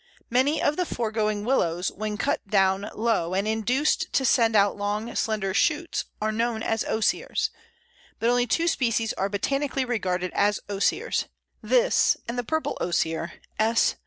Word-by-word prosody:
Many 275 Hz, +5 st, +2 dB
of 295 Hz, 0 st, +1 dB
the 360 Hz, -, +1 dB
foregoing 215 Hz, -2 st, -1 dB
Willows, 180 Hz, -8 st, +1 dB
when 210 Hz, 0 st, -4 dB
cut -, -, -1 dB
down 195 Hz, 0 st, +2 dB
low 215 Hz, -6 st, 0 dB
and 200 Hz, +2 st, 0 dB
induced 235 Hz, +7 st, +1 dB
to 265 Hz, -, +2 dB
send 230 Hz, -3 st, +3 dB
out 200 Hz, -1 st, +4 dB
long, 210 Hz, +3 st, -3 dB
slender 210 Hz, -4 st, -1 dB
shoots, 330 Hz, -, +1 dB
are 215 Hz, +1 st, 0 dB
known 225 Hz, 0 st, -1 dB
as 225 Hz, 0 st, 0 dB
Osiers, 220 Hz, -, 0 dB, 0.7 s
but 230 Hz, -, 0 dB
only 245 Hz, 0 st, +3 dB
two 330 Hz, +8 st, +1 dB
species 230 Hz, -8 st, +1 dB
are 195 Hz, -, -1 dB
botanically 275 Hz, +6 st, -1 dB
regarded 185 Hz, -7 st, -1 dB
as 205 Hz, 0 st, +2 dB
Osiers 205 Hz, -, 0 dB, 0.4 s
this -, -, +3 dB
and 235 Hz, -, -3 dB
the 245 Hz, -, -2 dB
Purple 315 Hz, +6 st, -2 dB
Osier 165 Hz, -1 st, -1 dB, 0.3 s
(_S. 225 Hz, +1 st, +3 dB
220 Hz, 155 wpm, -25 LUFS, 200-245 Hz, 0.7 s, out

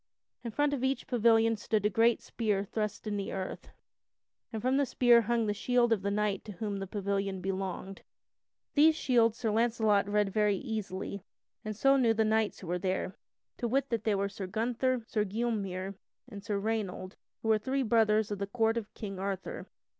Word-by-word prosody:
In 235 Hz, -, -3 dB
front 290 Hz, +5 st, +1 dB
of 265 Hz, -3 st, -2 dB
each 265 Hz, +1 st, 0 dB
pavilion 225 Hz, -1 st, +3 dB
stood 210 Hz, 0 st, -1 dB
a -, -, +4 dB
great 230 Hz, +3 st, +3 dB
spear 210 Hz, -4 st, -1 dB
thrust 210 Hz, +2 st, -3 dB
in 210 Hz, -1 st, -2 dB
the 200 Hz, -, -3 dB
earth, 190 Hz, -1 st, -5 dB, 0.8 s
and 220 Hz, -, -3 dB
from 255 Hz, +4 st, +1 dB
the 285 Hz, -, +3 dB
spear 240 Hz, -1 st, +5 dB
hung 235 Hz, 0 st, 0 dB
the 205 Hz, -, 0 dB
shield 240 Hz, +2 st, +2 dB
of 210 Hz, -, -1 dB
the 200 Hz, -, -1 dB
knight 205 Hz, -1 st, 0 dB
to 210 Hz, -, -7 dB
whom 205 Hz, +2 st, -3 dB
the 195 Hz, -, -5 dB
pavilion 195 Hz, -1 st, -2 dB
belonged. 190 Hz, 0 st, -4 dB, 0.7 s
These 310 Hz, +2 st, +6 dB
shields 235 Hz, -6 st, +2 dB
Sir 225 Hz, -3 st, -1 dB
Launcelot 220 Hz, -3 st, +2 dB
read 205 Hz, -1 st, +1 dB
very 210 Hz, -2 st, +2 dB
easily, 200 Hz, -4 st, -4 dB, 0.4 s
and 215 Hz, -1 st, -4 dB
so 275 Hz, +5 st, +4 dB
knew 235 Hz, -4 st, +3 dB
the 220 Hz, 0 st, +2 dB
knights 220 Hz, 0 st, +1 dB
who -, -, -8 dB
were 180 Hz, +1 st, -1 dB
there. 185 Hz, 0 st, -2 dB, 0.4 s
To 240 Hz, -, -2 dB
wit: 270 Hz, +3 st, 0 dB
that 230 Hz, -3 st, -1 dB
they 215 Hz, -2 st, +2 dB
were 200 Hz, 0 st, 0 dB
Sir 195 Hz, -1 st, -6 dB
Gunther, 235 Hz, +4 st, 0 dB
Sir 215 Hz, -2 st, 0 dB
Gylmere, 200 Hz, -3 st, -2 dB, 0.3 s
and 200 Hz, -1 st, -9 dB
Sir 205 Hz, -1 st, -1 dB
Raynold, 200 Hz, -3 st, -3 dB, 0.3 s
who 225 Hz, -, -1 dB
were 220 Hz, -1 st, +4 dB
three 265 Hz, +4 st, -1 dB
brothers 215 Hz, -2 st, +3 dB
of 205 Hz, -, -3 dB
the 200 Hz, -, -2 dB
Court 225 Hz, +1 st, +1 dB
of 215 Hz, -3 st, -4 dB
King 195 Hz, -3 st, -6 dB
Arthur. 195 Hz, -1 st, -4 dB
215 Hz, 195 wpm, -31 LUFS, 200-235 Hz, 0.8 s, These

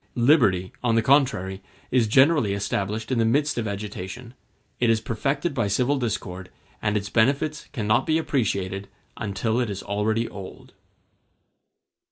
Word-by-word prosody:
Liberty, 120 Hz, -, +3 dB
on 120 Hz, -2 st, +2 dB
the 115 Hz, -, +3 dB
contrary, 110 Hz, -8 st, +2 dB, 0.3 s
is 125 Hz, -3 st, +3 dB
generally 130 Hz, -2 st, +4 dB
established 105 Hz, +3 st, -2 dB
in 125 Hz, -, +1 dB
the -, -, +4 dB
midst 140 Hz, +4 st, +1 dB
of 110 Hz, -, -2 dB
agitation, 105 Hz, +3 st, -6 dB, 0.5 s
it 120 Hz, -, +3 dB
is 115 Hz, -1 st, +3 dB
perfected 140 Hz, +9 st, -2 dB
by 115 Hz, -6 st, 0 dB
civil 125 Hz, +7 st, +1 dB
discord, 95 Hz, -6 st, -4 dB, 0.3 s
and 105 Hz, 0 st, +1 dB
its 100 Hz, 0 st, -4 dB
benefits 140 Hz, +6 st, +1 dB
cannot 110 Hz, -3 st, +1 dB
be 155 Hz, -, +3 dB
appreciated 100 Hz, -, -1 dB, 0.3 s
until 110 Hz, +2 st, -1 dB
it 120 Hz, -3 st, 0 dB
is 100 Hz, -1 st, -5 dB
already 110 Hz, +3 st, 0 dB
old. 95 Hz, -2 st, -10 dB
110 Hz, 145 wpm, -24 LUFS, 100-130 Hz, 0.5 s, generally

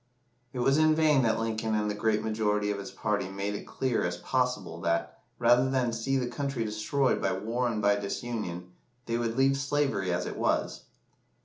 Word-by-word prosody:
It 130 Hz, -, -8 dB
was 135 Hz, +4 st, +3 dB
in 155 Hz, 0 st, +5 dB
vain 155 Hz, -3 st, +4 dB
that 115 Hz, -3 st, +2 dB
Lincoln 110 Hz, -1 st, -1 dB
and 105 Hz, 0 st, 0 dB
the 105 Hz, -, -1 dB
great 105 Hz, +1 st, 0 dB
majority 105 Hz, -2 st, 0 dB
of 100 Hz, -, -3 dB
his 100 Hz, -, -6 dB
party 105 Hz, -3 st, -2 dB
made 100 Hz, +1 st, -3 dB
it 105 Hz, -, -6 dB
clear 130 Hz, -3 st, -1 dB
as 90 Hz, 0 st, -2 dB
possible 125 Hz, -10 st, -1 dB
that, 85 Hz, 0 st, -1 dB, 0.2 s
rather 120 Hz, +2 st, +4 dB
than 125 Hz, -3 st, +1 dB
see 135 Hz, +4 st, 0 dB
the 130 Hz, -, 0 dB
country 130 Hz, -1 st, -3 dB
destroyed 110 Hz, +6 st, 0 dB
by 95 Hz, -2 st, +1 dB
war 115 Hz, +6 st, -1 dB
and 110 Hz, -3 st, -2 dB
by 100 Hz, 0 st, +4 dB
disunion, 100 Hz, -4 st, -4 dB, 0.3 s
they 115 Hz, 0 st, -1 dB
would 115 Hz, 0 st, -2 dB
leave 135 Hz, +1 st, +4 dB
slavery 135 Hz, -9 st, 0 dB
as 90 Hz, 0 st, -1 dB
it -, -, -5 dB
was. -, -, -1 dB
115 Hz, 195 wpm, -29 LUFS, 105-130 Hz, 0.3 s, in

